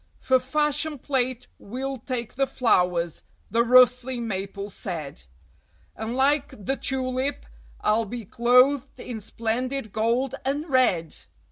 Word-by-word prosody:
"For 260 -1 +3
fashion 295 +3 -1
plate 255 -2 -1
we'll 265 +4 -5
take 240 -1 -4
the 270 +1 +1
flowers," 180 - +1 0.3
the 230 - +3
rustling 250 0 +4
Maple 200 0 -4
said, 160 - -6 0.7
"And 220 +2 -4
like 275 -6 +1
the 270 - +1
Tulip 260 +1 -2 0.4
I'll 220 +2 +2
be 230 +1 -6
clothed 250 +5 +3
in 235 -3 -6
splendid 230 +3 -3
gold 235 +4 +1
and 285 +4 -2
red!" 220 - +2
250 Hz, 120 wpm, -25 LUFS, 220-265 Hz, 0.7 s, rustling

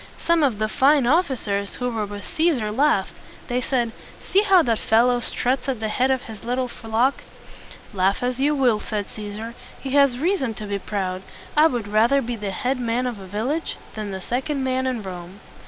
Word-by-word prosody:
Some 335 -1 +2
of 265 -8 +2
the 215 +1 0
fine 275 +4 +4
of 330 +9 +4
fi 265 - -2
cers 200 -3 -3
who 250 0 -2
were 220 -3 -2
with 205 0 -7
Cæsar 305 -11 0
laughed. 270 -8 +2 0.4
They 250 +1 0
said, 240 -2 0 0.3
"See 395 - +2
how 390 -4 +5
that 230 -5 +1
fellow 240 +2 +3
struts 255 +2 -1
at 255 -4 -1
the 220 -1 -2
head 255 +4 +1
of 260 -1 +1
his 220 -2 -10
little 250 +2 -1
flock!" 235 +3 0 0.7
"Laugh 195 +3 +1
as 250 0 -1
you 295 +2 +2
will," 245 -6 +3
said 210 -2 -4
Cæsar, 215 +2 -7 0.3
"he 270 - -5
has 280 -3 +4
reason 275 - 0
to 210 - -6
be 200 -1 -2
proud. 185 -2 -3 0.3
I 305 +2 +7
would 240 -8 -3
rather 225 +6 +4
be 240 -2 -3
the 210 -2 -4
head 250 +7 -1
man 240 +1 0
of 240 -4 -3
a 190 - -10
village 245 - -2 0.2
than 215 -1 -5
the 190 -1 -5
second 270 +6 -2
man 260 0 0
in 245 -4 -2
Rome!" 180 0 -8
240 Hz, 205 wpm, -23 LUFS, 210-270 Hz, 0.7 s, I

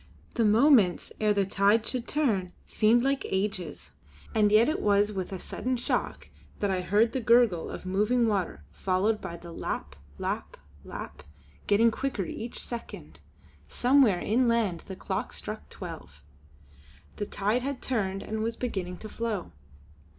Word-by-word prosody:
The 230 - +2
moments 215 - +4
ere 215 -1 +3
the 200 -1 +2
tide 200 +4 +3
should 250 -1 -3
turn 210 -12 0
seemed 230 +2 +3
like 275 0 +1
ages; 190 -5 -3 0.4
and 210 -2 +3
yet 220 +3 +6
it 310 - 0
was 205 0 +3
with 190 -1 -4
a 190 - -3
sudden 255 +7 -3
shock 240 - -2 0.3
that 205 -1 +1
I 185 -1 0
heard 210 +6 +3
the 260 - -2
gurgle 230 -7 +4
of - - -7
moving 210 +6 +2
water 200 -5 -1
followed 195 +3 0
by 170 - -6
the 170 0 -11
lap, 70 - -4 0.2
lap, - - -4 0.3
lap, - - -8 0.5
getting 225 +3 +5
quicker 240 -5 -2
each 230 +6 -6
second. 235 -1 -7 0.5
Somewhere 250 -7 +4
inland 230 -5 +1
a 190 - -5
clock - - -4
struck 70 - -7
twelve. 70 0 -9 0.9
The 205 - -3
tide 210 +5 0
had 275 +1 -3
turned 195 -6 -2
and 220 0 -3
was 230 +1 -1
beginning 190 -8 -3
to - - -4
flow. 215 - -3
210 Hz, 150 wpm, -28 LUFS, 190-235 Hz, 0.9 s, yet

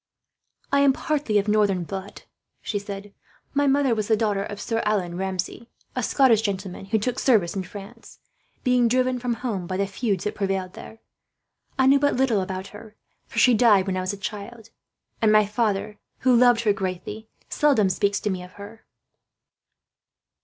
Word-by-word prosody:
"I 280 - +3
am 280 -1 +5
partly 290 -8 -1
of 205 +1 +1
northern 205 -4 +2
blood," 195 +3 -7 0.4
she 205 - -3
said. 200 0 -8 0.4
"My 285 0 +2
mother 275 -2 +3
was 215 -2 -2
the 220 - +3
daughter 210 -3 0
of 205 0 -7
Sir 225 -1 -2
Allan 195 -5 -1
Ramsay, 190 +4 -4 0.3
a - - -1
Scottish 250 -6 +4
gentleman 195 -3 -4
who 205 +3 +1
took 245 +4 -2
service 210 -10 +2
in 195 - -1
France, 205 +5 -11 0.5
being 250 -2 +3
driven 255 +1 +1
from 240 -1 -1
home 220 -8 -4
by 185 - -3
the 200 - +1
feuds 195 -1 -2
that 210 - -2
prevailed 195 -2 -2
there. 225 - -11 0.8
I 265 - +3
knew 275 +1 +5
but 285 0 +2
little 245 -6 +2
about 190 +1 -5
her, 210 +1 -13 0.3
for - - -12
she 250 - +6
died 210 -4 +5
when 190 -1 -2
I 185 - -1
was 185 +1 -2
a 200 - -7
child; 215 +3 -7 0.5
and 220 -1 +4
my 215 0 +5
father, 210 -1 -1 0.2
who 255 -1 +4
loved 240 -1 +5
her 215 -3 +2
greatly, 195 +3 -5 0.2
seldom 275 -9 +3
speaks 200 +2 0
to 210 - -1
me 185 -1 -3
of 180 0 -12
her." 205 +3 -12
210 Hz, 180 wpm, -24 LUFS, 195-240 Hz, 0.8 s, she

